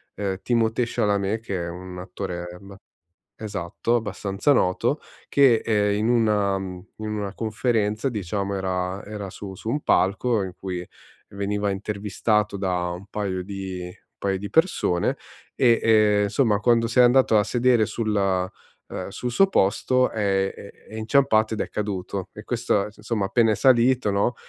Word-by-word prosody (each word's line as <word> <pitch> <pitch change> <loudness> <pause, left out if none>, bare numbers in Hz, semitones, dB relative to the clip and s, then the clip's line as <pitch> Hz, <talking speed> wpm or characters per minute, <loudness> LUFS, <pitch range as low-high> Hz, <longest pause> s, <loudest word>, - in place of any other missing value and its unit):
ehm, 95 -2 -2
Timothée 115 0 +1
Chalamet- 100 0 0
che 100 -4 -4
è - - -4
un 90 +1 -8
attore 90 -1 -5
ba 100 0 -12 0.6
esatto, 105 +2 -3
abbastanza 100 +2 0
noto, 90 -8 +1 0.3
che, 130 -5 +4
ehm, 105 -2 +2
in 110 +2 0
una 105 -4 +2
in 95 -1 -6
una 105 -2 -4
conferenza 110 +1 0
diciamo 100 -3 -3
era 95 0 -2
era 100 -2 -6
su 95 0 -8
su 110 - -8
un 145 +5 0
palco 105 +3 +2
in 95 -1 -6
cui 90 -2 -4 0.5
veniva 100 0 -1
intervistato 105 +1 -1
da 90 -2 -1
un 90 +3 -7
paio 95 -3 -3
di 95 -1 -6
un 90 0 -14
paio 95 -1 -1
di 100 +1 -6
persone 160 - +1 0.4
e, 120 -3 +4
ehm, 105 -2 +4
insomma 105 -1 +1
quando 115 -1 +3
si 115 +2 -2
è - - +9
andato 125 -2 +5
a 105 - +4
sedere 120 -2 +2
sul, 110 -2 -2 0.7
ehm, - - -5
sul 125 - -4
suo 195 +11 +4
posto 125 - +2
è, 95 -2 0
ehm, 100 - -10 0.2
è - - -11
inciampato 110 -1 +2
ed 110 - -5
è - - -7
caduto. 95 -2 -4
E 105 - -10
questo 115 -4 0
insomma 105 -1 -2
appena 115 +3 +3
è - - +2
salito, 125 -2 +4
no, 100 +5 +1
105 Hz, 160 wpm, -24 LUFS, 95-115 Hz, 0.7 s, è